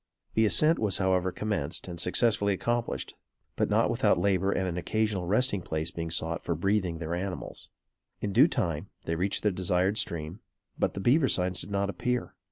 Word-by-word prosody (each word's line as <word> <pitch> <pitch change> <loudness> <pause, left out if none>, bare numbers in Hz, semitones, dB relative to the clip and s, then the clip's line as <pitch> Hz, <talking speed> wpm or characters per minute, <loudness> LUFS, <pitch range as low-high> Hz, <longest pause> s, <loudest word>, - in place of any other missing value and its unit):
The 110 0 +3
ascent 155 +9 +4
was 105 -4 +1
however 95 -1 +1
commenced 100 -10 -2
and 85 -2 -7
successfully 100 +2 +2
accomplished; 120 +4 -2 0.4
but, - - 0
not - - +3
without - - +2
labor 95 -1 +1
and 95 - 0
an 85 - -3
occasional 100 0 -1
resting 105 0 +2
place 80 0 -3
being 85 0 -4
sought 80 0 -1
for 85 - -1
breathing 95 0 0
their 80 0 -4
animals. 90 +1 -5 0.5
In 100 - -3
due 130 +9 +7
time, 90 - -2 0.2
they 80 - -1
reached 90 +4 -1
the 105 - +3
desired 90 +2 +1
stream; 85 +3 -4 0.4
but, - - -1
the - - -3
beaver 135 +7 +4
signs 90 -4 +1
did - - -8
not 100 0 0
appear. 125 +4 -2
95 Hz, 180 wpm, -28 LUFS, 85-105 Hz, 0.5 s, due